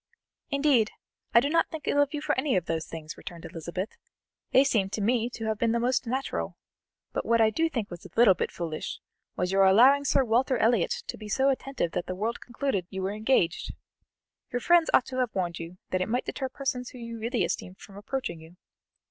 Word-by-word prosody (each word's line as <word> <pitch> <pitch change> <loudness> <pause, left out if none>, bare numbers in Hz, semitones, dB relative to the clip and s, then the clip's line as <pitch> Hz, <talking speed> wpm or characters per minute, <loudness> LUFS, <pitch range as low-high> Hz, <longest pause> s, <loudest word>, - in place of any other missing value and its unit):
"Indeed, 280 -6 +3 0.4
I 235 - +7
do 260 - +1
not 330 +3 +2
think 320 -3 -7
ill 285 - +3
of 285 -1 +1
you 295 - -3
for - - +1
any 265 0 +1
of 180 -3 +1
those 165 -1 -2
things," 155 -1 -7
returned 170 -3 -9
Elizabeth; 175 +5 -5 0.5
"they 265 - +6
seem 215 -8 +1
to 215 - -4
me 235 +3 +1
to 230 -2 -6
have 220 -1 -1
been 230 -1 +2
most 245 +1 +1
natural; 260 +3 -2 0.6
but - - -1
what 230 - +3 0.2
do 325 - +2
I - - +1
think 230 -10 -3
was 175 - -8
a 190 - -11
little 230 -4 +7
bit 175 - -3
foolish, 165 -3 -5 0.4
was 180 0 -1
your 195 0 +4
allowing 250 +9 +6
Sir 275 -1 +3
Walter 250 +2 +2
Elliot 225 -5 +2
to - - -6
be 215 -1 -8
so 265 +6 +3
attentive 270 -9 -1
that 175 - -3
the 185 - -3
world 220 +5 -2
concluded 240 -7 -2
you 190 0 -4
were 190 - -1
engaged. 215 -5 +1 0.8
Your 245 - 0
friends 345 +5 +4
ought 250 - +5
to 255 - -6
have 250 -5 0
warned 175 -3 -1
you 170 +2 -8
that 185 - +1
it 185 - -1
might 245 +3 0
deter 265 -1 -3
persons 255 -2 -4
you 230 -2 -7
really 235 +2 0
esteemed 185 +1 -3
from 200 -1 -14
approaching 205 -3 -4
you." 160 +2 -15
230 Hz, 215 wpm, -28 LUFS, 190-265 Hz, 0.8 s, I